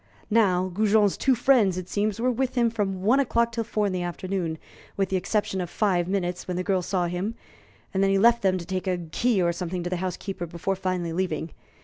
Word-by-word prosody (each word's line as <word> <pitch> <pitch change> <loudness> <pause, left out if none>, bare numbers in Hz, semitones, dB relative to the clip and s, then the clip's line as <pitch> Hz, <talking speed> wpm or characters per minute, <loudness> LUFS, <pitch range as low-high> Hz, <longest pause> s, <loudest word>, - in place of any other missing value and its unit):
Now, 185 -5 +3
Goujon's 210 +1 +3
two 265 -1 +2
friends, 235 -7 +3
it 180 -1 -5
seems, 210 +1 -1
were 250 +2 +2
with 255 +1 -1
him 235 -2 +3
from 195 -4 -2
one 240 +7 +4
o'clock 235 -3 +2
till 230 0 -2
four 215 -2 -1
in 195 - -1
the 180 - -1
afternoon, 175 -1 -3 0.4
with 195 -2 +1
the 190 - 0
exception 195 0 -1
of 175 - -4
five 180 -5 +1
minutes 180 -2 -2
when 180 -1 -2
the 185 - -1
girl 190 -1 +1
saw 180 0 -1
him, 180 +6 -3 0.6
and 190 - +1
then 195 - +3
he 195 - +3
left 235 +3 +5
them 190 -1 +2
to 170 - -6
take 185 +2 -3
a 180 -1 +1
key 185 +5 0
or 170 0 +2
something 175 0 -4
to 175 - -4
the 180 - 0
housekeeper 185 -1 -4
before 170 +4 -2
finally 185 -3 -2
leaving. 165 -3 -2
190 Hz, 230 wpm, -25 LUFS, 180-215 Hz, 0.6 s, left